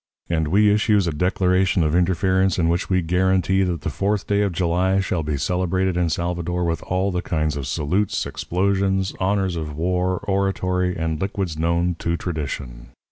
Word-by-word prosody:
And 80 -2 +1
we 105 +5 +4
issues 105 -2 +2
a 85 - 0
declaration 90 +2 +2
of 75 0 0
interference 95 +1 +2
in 85 -2 +2
which 85 +2 -1
we 95 -2 +2
guarantee 95 +2 +2
that 90 -5 -1
the - - -3
fourth 100 +1 -1
day 100 0 +1
of 100 -2 +1
July 90 +2 +1
shall 95 -3 -1
be 75 -1 -2
celebrated 90 +3 0
in 90 -1 +1
Salvador 85 +1 -2
with 85 -2 -1
all 95 +2 -1
the 90 -1 -1
kinds 80 -4 -1
of 70 -2 -4
salutes, 85 +8 0
explosions, 95 +1 0
honours 95 -1 +1
of 75 -3 -5
war, 90 +3 0
oratory, 90 -2 0
and 80 -1 -2
liquids 95 -4 -2
known 85 +2 0
to 85 0 -1
tradition. 70 -8 -5
90 Hz, 175 wpm, -22 LUFS, 85-95 Hz, -, we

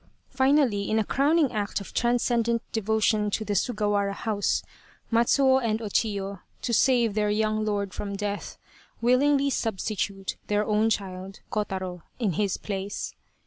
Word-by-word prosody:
Finally, 265 -6 +2
in 220 - +2
a 220 - +3
crowning 290 +5 +2
act 205 -2 -2
of 200 - -10
transcendent 235 -1 +1
devotion 220 -1 +1
to 215 +2 -2
the 205 - -1
Sugawara 205 -1 +1
House, 205 -2 0 0.5
Matsuo 260 +3 +4
and 220 -1 0
Chiyo, 200 -3 -1 0.2
to 235 - -1
save 235 -2 +3
their 210 0 +1
young 215 +1 +1
lord 200 -2 -1
from 200 -1 -4
death, 205 0 -4 0.4
willingly 275 +3 +3
substitute 200 -3 -2
their 210 0 +1
own 215 +1 +2
child, 190 -2 -4
Kotaro, 190 -4 -3 0.2
in 220 -6 0
his 195 +3 0
place. 200 -1 -4
215 Hz, 140 wpm, -26 LUFS, 200-235 Hz, 0.5 s, Matsuo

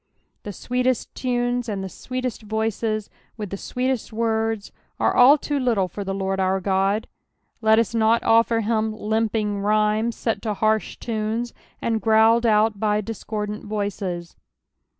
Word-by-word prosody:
The 205 - -6
sweetest 250 +4 -1
tunes 245 -1 -1
and 200 -2 -3
the - - -4
sweetest 255 +5 -5
voices, 220 0 -2 0.3
with 210 -3 -5
the - - -2
sweetest 255 +2 -2
nords, 225 -1 -1 0.3
are - - +2
all 265 +4 +8
too 290 0 -2
little 230 -7 +1
for 200 +3 -6
the 195 - -4
Lord 195 0 -2
our 190 0 +2
Ood; 195 +2 0 0.5
let 220 0 +5
us 230 0 +1
not 225 0 +3
offer 230 0 +4
him 220 0 0
limping 215 -1 0
rhymes, 215 +2 +1
se^to 220 -2 -2
harsh 215 +1 0
tunes, 225 +1 -3 0.3
and 225 -1 0
growled 225 +1 +4
out 215 -1 +3
by 210 0 +1
discordant 210 -1 -5
voices. 195 -5 -3
220 Hz, 145 wpm, -23 LUFS, 210-230 Hz, 0.5 s, all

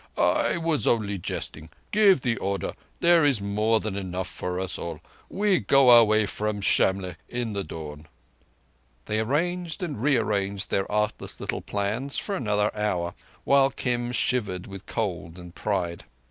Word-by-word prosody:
I - - +2
was 165 -3 0
only 105 -4 +1
jesting. 80 -1 -4 0.2
Give 205 -8 +5
the 120 -2 0
order. 100 0 -2 0.3
There 170 -1 +5
is 140 -6 +3
more 105 +3 +1
than 110 -3 -4
enough 95 -2 -3
for 90 +1 -4
us 95 -1 -3
all. 85 - -5 0.3
We 200 -3 +2
go 135 -2 +5
our 120 -1 +9
way 110 0 +3
from 105 0 -2
Shamlegh 95 -2 +2
in 120 -3 -3
the 100 -1 -2
dawn." 75 -3 -8 1.0
They 105 0 -1
arranged 165 - -1
and 145 -10 -4
re 140 0 +3
arranged 100 -2 -1
their 95 - 0
artless 105 +1 -2
little - - -3
plans 110 +7 -2
for 200 - -2
another 105 -4 0
hour, 90 -5 -1 0.3
while 140 -1 +4
Kim 120 -2 -2
shivered 105 -7 0
with 95 -1 -10
cold 90 -6 -3
and 90 -1 -11
pride. 90 -5 -2
105 Hz, 160 wpm, -26 LUFS, 95-130 Hz, 1.0 s, our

